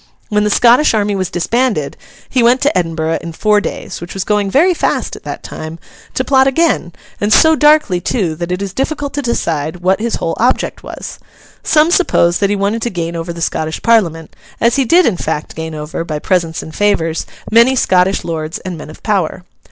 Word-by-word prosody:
When 210 Hz, -1 st, +1 dB
the 210 Hz, -, +1 dB
Scottish 240 Hz, +5 st, +4 dB
army 205 Hz, -1 st, 0 dB
was 185 Hz, -2 st, -2 dB
disbanded, 205 Hz, -, -1 dB, 0.3 s
he 255 Hz, -, +1 dB
went 240 Hz, +2 st, +4 dB
to 290 Hz, +2 st, +1 dB
Edinburgh 165 Hz, -2 st, -1 dB
in 170 Hz, -1 st, -7 dB
four 210 Hz, +4 st, +2 dB
days—which 175 Hz, -3 st, -6 dB
was 190 Hz, -, -2 dB
going 205 Hz, -1 st, 0 dB
very 330 Hz, -, +4 dB
fast -, -, -1 dB
at -, -, -11 dB
that -, -, -6 dB
time—to 165 Hz, +10 st, -7 dB
plot 265 Hz, 0 st, +3 dB
again, 295 Hz, -, +1 dB, 0.3 s
and 205 Hz, +1 st, 0 dB
so 320 Hz, +8 st, +6 dB
darkly 295 Hz, -, +3 dB
too, 180 Hz, -4 st, -1 dB
that 170 Hz, +1 st, -4 dB
it 180 Hz, +2 st, -2 dB
is 195 Hz, -2 st, -5 dB
difficult 285 Hz, +2 st, -3 dB
to 290 Hz, -, -2 dB
decide 165 Hz, -, -2 dB
what 190 Hz, +3 st, +2 dB
his 235 Hz, 0 st, -1 dB
whole 165 Hz, -, -2 dB
object 250 Hz, +3 st, 0 dB
was. -, -, -8 dB, 0.4 s
Some 310 Hz, +2 st, +3 dB
suppose 175 Hz, -, +2 dB
that 200 Hz, -, +1 dB
he 205 Hz, -, +1 dB
wanted 205 Hz, +3 st, -1 dB
to 240 Hz, -, -1 dB
gain 170 Hz, -4 st, -4 dB
over 165 Hz, +1 st, -4 dB
the 170 Hz, 0 st, -8 dB
Scottish 160 Hz, -1 st, -2 dB
Parliament, 170 Hz, -9 st, +1 dB, 0.2 s
as 235 Hz, 0 st, +2 dB
he 270 Hz, -, +2 dB
did 345 Hz, +10 st, +4 dB
in 205 Hz, -7 st, +1 dB
fact 155 Hz, -2 st, -3 dB
gain 160 Hz, 0 st, -6 dB
over, 150 Hz, +2 st, -5 dB
by 155 Hz, -2 st, -4 dB
presents 165 Hz, 0 st, -1 dB
and 160 Hz, -, -10 dB
favours, 165 Hz, -6 st, 0 dB, 0.2 s
many 235 Hz, +4 st, +5 dB
Scottish 190 Hz, -4 st, +2 dB
lords 160 Hz, -1 st, -4 dB
and 180 Hz, -3 st, -7 dB
men 150 Hz, -, -9 dB
of 155 Hz, -, -13 dB
power. 190 Hz, -5 st, -1 dB
195 Hz, 200 wpm, -15 LUFS, 165-240 Hz, 0.4 s, so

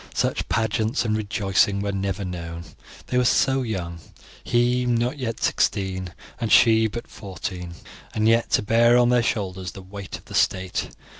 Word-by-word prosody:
Such -, -, -1 dB
pageants 110 Hz, +2 st, 0 dB
and 110 Hz, -1 st, +1 dB
rejoicing 100 Hz, -1 st, +1 dB
were 100 Hz, 0 st, -2 dB
never 100 Hz, 0 st, -2 dB
known. 85 Hz, -2 st, -6 dB, 0.4 s
They 125 Hz, -, 0 dB
were -, -, +3 dB
so 135 Hz, +2 st, +3 dB
young, 90 Hz, -8 st, -4 dB, 0.4 s
he 120 Hz, +1 st, +2 dB
not 120 Hz, +4 st, 0 dB
yet 115 Hz, -3 st, -4 dB
sixteen, 95 Hz, -2 st, 0 dB, 0.2 s
and 115 Hz, -3 st, -2 dB
she 110 Hz, -1 st, +6 dB
but 120 Hz, +2 st, -6 dB
fourteen, 90 Hz, -3 st, -7 dB, 0.4 s
and 110 Hz, 0 st, +2 dB
yet 115 Hz, +1 st, +3 dB
to -, -, +3 dB
bear 115 Hz, +3 st, +4 dB
on 120 Hz, -1 st, +4 dB
their 125 Hz, -1 st, +4 dB
shoulders 95 Hz, -6 st, -3 dB
the 95 Hz, -, -10 dB
weight 100 Hz, +1 st, -8 dB
of -, -, -19 dB
the -, -, -12 dB
state. 95 Hz, -1 st, 0 dB
105 Hz, 165 wpm, -23 LUFS, 95-120 Hz, 0.4 s, she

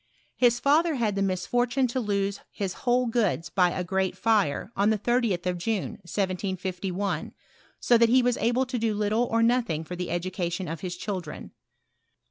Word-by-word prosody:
His 240 Hz, -1 st, +3 dB
father 305 Hz, +5 st, +3 dB
bad 220 Hz, -4 st, 0 dB
the 200 Hz, -, -1 dB
mislbrttine 245 Hz, +7 st, +1 dB
to 255 Hz, -, -1 dB
lose 200 Hz, -3 st, -1 dB
his 195 Hz, -3 st, -3 dB, 0.2 s
whole 250 Hz, +1 st, +3 dB
goods 225 Hz, -8 st, 0 dB
by 180 Hz, -2 st, +3 dB
a 180 Hz, -, -3 dB
great 190 Hz, +1 st, -1 dB
fire, 205 Hz, -3 st, +1 dB
on 200 Hz, +2 st, +3 dB
the 220 Hz, -, +2 dB
30th 220 Hz, -5 st, 0 dB
of 180 Hz, -1 st, -1 dB
June, 210 Hz, +2 st, -1 dB
1751, 185 Hz, 0 st, -3 dB, 0.5 s
so 240 Hz, -2 st, +4 dB
that 230 Hz, 0 st, +5 dB
he 255 Hz, +1 st, +5 dB
was 245 Hz, -1 st, +2 dB
able 245 Hz, +3 st, +1 dB
to 250 Hz, -1 st, -3 dB
do 220 Hz, -1 st, 0 dB
little 215 Hz, +3 st, +1 dB
or 230 Hz, -1 st, +1 dB
nothing 230 Hz, -10 st, +1 dB
for 180 Hz, +3 st, -7 dB
the 180 Hz, 0 st, -4 dB
education 175 Hz, 0 st, -2 dB
of 165 Hz, +2 st, -5 dB
bis 180 Hz, -2 st, -5 dB
children. 180 Hz, -5 st, -5 dB
205 Hz, 175 wpm, -26 LUFS, 185-240 Hz, 0.5 s, that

